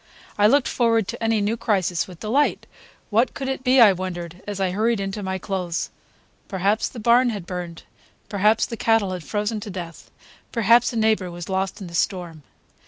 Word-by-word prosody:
I 205 0 +5
looked 280 +4 +3
forward 230 -4 +2
to - - -5
any 225 -1 +2
new 210 +3 0
crisis 190 -6 0
with 180 -3 -13
delight. 260 +7 +1 0.5
What 230 +5 +2
could 270 - -4
it 265 -1 -3
be, 260 +1 +4
I 215 -5 +8
wondered, 175 -1 -6
as 205 -1 -4
I 190 -2 +1
hurried 220 +3 +1
into 195 +1 -4
my 190 -1 -2
clothes. 180 -2 -3 0.6
Perhaps 200 +3 0
the 245 - -9
barn 240 +3 +4
had 205 -6 -5
burned; 175 -2 -6 0.4
perhaps 215 +2 +2
the 230 - -6
cattle 225 -4 +2
had 180 -3 -5
frozen 210 +3 -2
to 210 - -8
death; 175 -4 -8 0.4
perhaps 235 +1 +4
a - - -7
neighbor 220 -4 +2
was 175 +1 -8
lost 190 +2 -2
in - - -5
the 170 - -10
storm. 170 -2 -2
205 Hz, 190 wpm, -23 LUFS, 185-225 Hz, 0.6 s, I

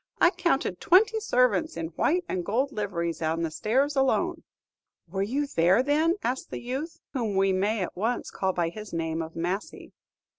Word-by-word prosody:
"I 345 - +6
counted 335 - 0
twenty 435 +5 +4
servants 250 - +1
in 165 -1 -3
white 340 - +1
and 180 - -2
gold 255 +9 0
liveries 170 - -3
on 160 +1 0
the 165 - -2
stairs 265 - +1
alone." 330 +6 +1 0.7
"Were 190 +3 -3
you 265 +9 0
there, 185 -2 +3
then?" 310 +5 +2
asked 255 +2 -2
the - - -5
youth, 270 +7 -5
whom 230 -7 -1
we 195 0 +3
may 200 +2 +1
at - - -6
once 225 +6 -2
call 190 -1 0
by 175 -2 0
his 210 +2 -9
name 165 -1 -2
of 160 0 -7
Massy. 180 +5 -4
215 Hz, 180 wpm, -27 LUFS, 175-280 Hz, 0.7 s, I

